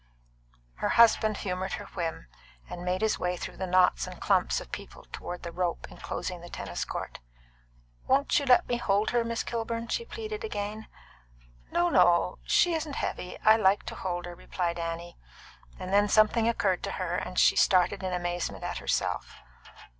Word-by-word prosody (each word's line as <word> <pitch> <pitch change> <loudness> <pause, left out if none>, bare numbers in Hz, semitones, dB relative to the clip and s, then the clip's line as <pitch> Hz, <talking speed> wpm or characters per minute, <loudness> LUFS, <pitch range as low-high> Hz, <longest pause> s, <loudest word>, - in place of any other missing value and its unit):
Her - - -1
husband 220 -2 +5
humoured 185 0 -3
her 205 - -5
whim, 165 - -3 0.4
and 175 - -7
made 180 +2 -1
his 220 - +1
way 180 0 -1
through - - -7
the 190 - -3
knots 180 0 +3
and - - -9
clumps - - +2
of - - -11
people - - -8
toward 175 - -6
the 170 - -5
rope 175 -1 -2
enclosing 180 -2 -5
the 175 - -10
tennis 95 - -4
court. - - -6 0.9
"Won't 275 +3 +3
you 285 - -4
let 250 - +5
me 240 - 0
hold 205 -3 +1
her, 240 -1 +2
Miss 230 0 -2
Kilburn?" 230 0 -3
she 470 - -1
pleaded 435 -1 -6
again. 215 - -4 0.8
"No, 175 0 +2
no; 180 -1 +4
she 350 - +3
isn't 310 -3 -3
heavy; 180 - -4
I 215 +1 +6
like 200 -2 +3
to - - -7
hold 175 -1 -3
her," 175 - -7
replied 175 0 -3
Annie. 170 +1 -5 0.6
Then 200 +3 +2
something 220 +2 +4
occurred 195 -5 +1
to 195 - -4
her, 180 -2 -3
and 180 - -5
she - - +5
started 190 +1 +3
in 185 -1 -3
amazement 175 -1 -3
at - - -3
herself. - - -2
190 Hz, 175 wpm, -28 LUFS, 175-230 Hz, 0.9 s, I